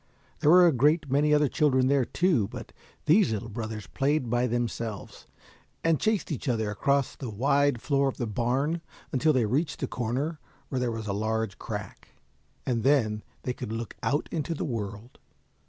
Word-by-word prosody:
There 150 - +3
were 180 +2 +8
a 170 - +6
great 145 +2 +2
many 145 +2 +3
other 150 0 +4
children 130 -3 +2
there, 135 -2 +3
too, 165 - +1
but - - -9 0.3
these 175 - +5
little 110 +2 -3
brothers 110 -1 -5
played 140 -3 0
by 120 +1 +2
themselves, 115 -3 -4 0.6
and 165 -2 +3
chased 215 -5 0
each 145 -1 -3
other 110 -3 0
across 140 +6 +1
the 130 - -6
wide 140 +3 +1
floor 140 -1 +2
of 135 - -3
the 120 - -2
barn 130 +9 0 0.3
until 155 +3 +3
they 130 -6 +2
reached 140 +8 -1
a - - +1
corner 130 +8 -2 0.3
where 130 - -1
there 125 -2 0
was 110 -1 -5
a 100 - -2
large 110 0 -2
crack, - - -6 0.6
and 120 -3 0
then 110 -5 +2 0.2
they 125 - -2
could 110 - -6
look 115 -1 -5
out 145 +3 0
into 165 0 -2
the - - -3
world. 110 -1 -5
130 Hz, 180 wpm, -27 LUFS, 115-150 Hz, 0.6 s, were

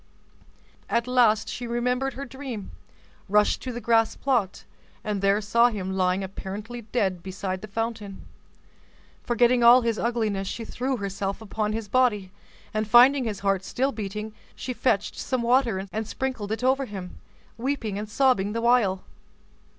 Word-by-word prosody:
At 235 - +1
last 240 -4 +3
she 245 - -5
remembered 250 +3 -1
her 275 +2 -6
dream, 250 -5 -7 0.6
rushed 210 +1 +3
to 255 - -4
the 240 - -5
grass 225 -1 +2
plot, 240 -9 -1 0.4
and 210 -2 -2
there 200 +1 +3
saw 235 +4 +4
him 190 -4 -4
lying 185 0 +1
apparently 205 +5 -6
dead 190 -7 0
beside 190 0 -4
the 215 - -7
fountain. 215 -2 -4 1.0
Forgetting 240 0 +3
all 240 +2 +8
his 230 -2 -1
ugliness, 220 -5 -1
she 230 +3 -5
threw 260 +3 -2
herself 200 -1 -3
upon 215 0 -2
his 220 -1 -4
body, 210 -5 +1 0.4
and 215 0 -1
finding 250 +4 +6
his 205 -3 -4
heart 195 -1 +1
still 265 +7 -1
beating, 210 -1 -5 0.2
she 255 - -4
fetched 225 -5 0
some 255 -2 -2
water 235 -6 +2
and 220 0 -3
sprinkled 255 -6 -3
it 225 +3 -3
over 265 +1 +2
him, 190 -5 -8 0.4
weeping 230 -5 -2
and 210 0 -6
sobbing 210 -4 +2
the 230 - -2
while. 230 -6 +3
220 Hz, 155 wpm, -25 LUFS, 200-245 Hz, 1.0 s, all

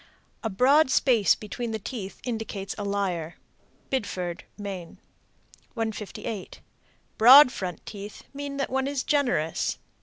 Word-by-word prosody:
A 225 - -1
broad 260 +8 +4
space 235 -7 +4
between 230 +3 -5
the - - -1
teeth 205 -2 -7
indicates 220 -5 -4
a 205 - -5
liar. 190 -5 -2 0.6
Biddeford, 185 -9 -3
Me. 195 -5 -7 0.8
158. 220 -2 -5 0.6
Broad 250 +4 +10
front 180 -6 -5
teeth 205 0 -8
mean 280 0 -5
that 275 - -2
one 265 +1 0
is 280 -2 -2
generous. 245 - 0
220 Hz, 120 wpm, -26 LUFS, 195-260 Hz, 0.8 s, Broad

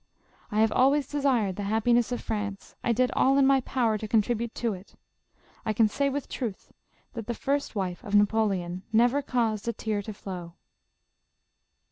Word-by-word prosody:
I 210 +1 +1
have 220 -1 +3
always 275 +4 +3
desired 255 -10 +1
the - - -3
happiness 235 +2 +2
of 245 - -2
France; 205 -2 -4
I 240 - +2
did 250 +2 +2
all 270 +1 +3
in 275 - +5
my 270 0 +5
power 235 -4 0
to 215 - -5
con 215 0 +3
tribute 235 +1 -3
to 230 -3 -1
it; 185 +1 -12 0.7
I 220 - -1
can 220 +1 +4
say 280 +6 0
with 280 0 -3
truth, 230 -7 -5 0.4
that 230 -4 -6
the 235 - -2
first 280 -1 -1
wife 185 -3 -3
of 205 - -2
Napoleon 200 -4 +2
never 240 +5 +3
caused 230 -5 -1
a 235 - 0
tear 215 -2 -2
to 215 - -7
flow." 175 -4 -7
225 Hz, 180 wpm, -27 LUFS, 205-250 Hz, 0.7 s, in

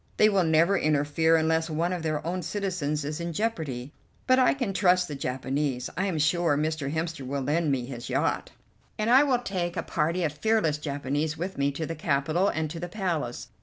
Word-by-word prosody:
They 215 - +6
will 195 -3 +3
never 165 +4 +4
interfere 155 +2 +2
unless 160 +1 +1
one 165 +3 0
of 180 - -3
their 155 -2 -2
own 180 +2 -2
citizens 170 -5 -2
is 150 +3 -4
in 170 0 -3
jeopardy, 155 - -3 0.3
but 255 0 +4
I 255 - +4
can 250 -8 -2
trust 180 -2 +3
the 150 - -6
Japanese. 135 0 -2
I 190 +3 0
am 180 -5 -1
sure 155 0 +2
Mr. 155 -2 -1
Hemster 160 -2 -3
will 135 +1 -3
lend 150 +2 +1
me 130 -3 0
his 120 -2 -7
yacht, - - 0 0.5
and 215 +2 +1
I 260 +2 +8
will 275 -4 +3
take 180 -7 -3
a - - -1
party 165 +3 0
of 150 -3 0
fearless 160 -3 +1
Japanese 145 +1 -2
with 185 +4 -4
me 140 0 +2
to 160 +3 -3
the 165 - -4
capital 155 +4 +1
and 160 -5 -1
to 165 - -6
the 175 +1 -5
Palace. 170 - -3
160 Hz, 205 wpm, -27 LUFS, 145-180 Hz, 0.5 s, I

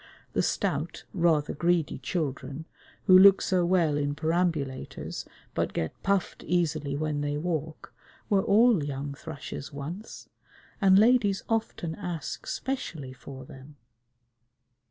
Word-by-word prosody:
The - - +2
stout, - - -1
rather 165 -5 +2
greedy 170 -2 +1
children, 140 0 -3 0.4
who 185 - +7
look 195 +1 +9
so 185 -2 +1
well 170 -5 +3
in 145 0 -1
perambulators 160 -4 -2 0.3
but - - -1
get 80 - -3
puffed 195 -2 0
easily 155 -5 0
when 150 -1 -1
they 145 0 -1
walk, 160 -1 -4 0.3
were 195 -2 +3
all 215 -4 +4
young 140 0 -4
thrushes 145 -1 -7
once, 155 +9 -7 0.5
and 190 -1 +6
ladies 215 -3 +4
often 220 -7 -1
ask 170 -4 -5
specially 165 - -4
for 130 0 -10
them. 135 +3 -13
160 Hz, 120 wpm, -28 LUFS, 145-185 Hz, 0.5 s, look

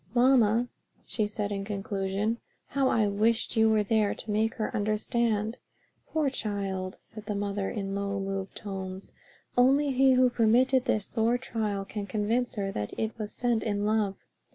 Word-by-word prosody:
"Mamma," 240 -2 +4 0.4
she 215 -2 -1
said 210 0 -3
in 195 -1 -2
conclusion, 200 +2 -2 0.3
"how 275 -1 +1
I 220 -2 +3
wished 220 +3 +1
you 220 0 +5
were 215 -1 +3
there 215 -1 +1
to 220 - -5
make 220 +2 +1
her 215 - -3
understand." 215 +1 0 0.5
"Poor 310 -2 0
child!" 195 -5 -3
said 215 -1 -12
the 210 - -2
mother, 200 -1 -2
in 195 -3 -3
low, 200 0 -2
moved 195 0 -4
tones, 190 -1 -6 0.4
"only 275 +3 +4
he 265 0 +5
who 255 -1 +4
permitted 245 +3 +3
this 215 -6 +1
sore 230 +1 +1
trial 210 -5 -3
can 205 0 -5
convince 225 +5 0
her 195 -2 -2
that 105 - -4
it 220 0 -2
was 210 -1 -4
sent 240 -3 0
in 205 -2 -1
love." 210 -2 +1
215 Hz, 165 wpm, -28 LUFS, 200-230 Hz, 0.5 s, you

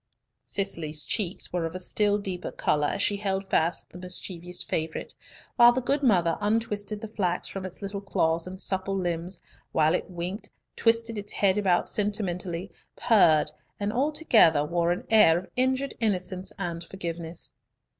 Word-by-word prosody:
Cicely's 160 -6 0
cheeks 190 -5 -1
were 175 -2 0
of 165 +1 -4
a - - -4
still 205 +3 +2
deeper 190 -3 -5
colour 150 -1 +1
as 200 - -1
she 205 - +1
held 195 -1 -2
fast 165 +2 +1
the 180 - -10
mischievous 180 -1 -3
favourite, 160 0 -3 0.4
while 240 -1 +9
the 250 - 0
good 275 +3 0
mother 180 - +3
untwisted 210 -1 -1
the 220 - -5
flax 185 -5 -2
from 190 -1 -5
its 185 +2 -7
little 200 0 -4
claws 165 -4 0
and 185 +1 -8
supple 195 0 0
limbs, 175 0 -3 0.3
while 155 +1 +3
it 180 - -2
winked, 185 +4 -5 0.3
twisted 230 -1 +1
its 205 0 -5
head 195 -2 +2
about 190 -4 +2
sentimentally, 190 -3 -2 0.2
purred, 165 -9 +4 0.3
and 205 +1 -1
altogether 245 - +4
wore 170 +2 +1
an 175 - -3
air 170 -7 +7
of 185 - -6
injured 260 +2 +1
innocence 185 -4 -1
and 170 -3 -4
forgiveness. 170 -2 -5
190 Hz, 160 wpm, -27 LUFS, 170-210 Hz, 0.4 s, while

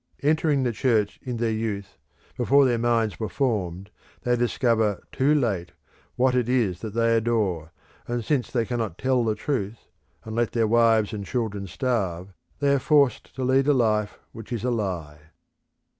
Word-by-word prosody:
Entering 150 -2 +2
the 125 - +1
Church 110 -2 0
in 125 -2 -4
their 115 0 0
youth, 105 -3 -4 0.4
before 135 +3 +4
their 120 -2 +1
minds 115 -4 +1
were 110 - -3
formed, 100 -7 -2 0.3
they 125 0 +2
discover 115 -4 +1
too 145 +3 +2
late 95 - -1 0.4
what 130 +1 +2
it 125 -2 +1
is 110 -9 +1
that 110 -1 -6
they 115 0 +3
adore, 105 -8 0 0.4
and 120 -2 -3
since 140 -5 0
they 120 -3 0
cannot 115 -7 -3
tell 130 -2 +1
the 110 -2 0
truth, 115 -6 -4 0.3
and 110 0 -7
let 120 -1 0
their 115 -2 +2
wives 115 -1 +3
and 105 -1 -4
children 105 -3 -3
starve, 95 -5 -2 0.2
they 140 -1 +2
are 140 - +2
forced 140 -3 +2
to 130 - -3
lead 130 +2 +3
a 145 - +5
life 105 -5 +1
which 115 +2 -11
is 115 -3 -3
a 125 - 0
lie. 90 -9 -3
115 Hz, 175 wpm, -25 LUFS, 105-125 Hz, 0.4 s, a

